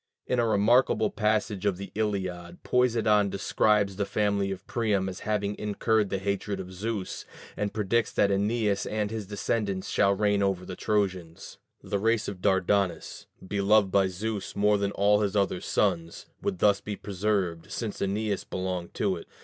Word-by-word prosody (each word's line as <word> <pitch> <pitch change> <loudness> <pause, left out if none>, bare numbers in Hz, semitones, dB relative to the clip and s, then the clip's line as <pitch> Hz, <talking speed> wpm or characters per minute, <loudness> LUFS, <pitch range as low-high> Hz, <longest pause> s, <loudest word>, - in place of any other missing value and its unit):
In 125 - 0
a 115 - +2
remarkable 110 +1 +3
passage 105 -2 0
of 100 -3 +1
the 100 -1 -8
Iliad, 95 -5 -3
Poseidon 110 -5 +3
describes 100 0 +1
the 100 - 0
family 100 -2 0
of 95 -1 -6
Priam 105 -5 0
as 95 0 -5
having 105 -1 -1
incurred 105 0 +1
the 100 - -1
hatred 100 0 -2
of 95 0 -7
Zeus, 105 +1 -4 0.3
and 105 -1 -2
predicts 110 +1 0
that 100 -1 +3
Æneas 105 0 0
and 105 -1 -1
his 110 -3 -5
descendants 100 -1 -2
shall 100 -1 +3
reign 105 0 +2
over 95 -2 0
the 90 - -6
Trojans: 95 -6 -2 0.2
the 100 - -2
race 115 +2 +1
of 95 -2 -6
Dardanus, 95 0 0 0.2
beloved 100 0 +3
by 95 -1 +4
Zeus 100 +1 -4
more 105 0 +3
than 100 0 0
all 105 +1 +3
his 100 -1 -1
other 100 -3 +1
sons, 85 -5 -1 0.2
would 195 0 -2
thus 100 - +3
be 105 - -5
preserved, 95 -4 -2
since 110 -4 -4
Æneas 100 +1 -1
belonged 90 -2 -4
to - - 0
it. - - -11
100 Hz, 165 wpm, -27 LUFS, 95-105 Hz, 0.3 s, by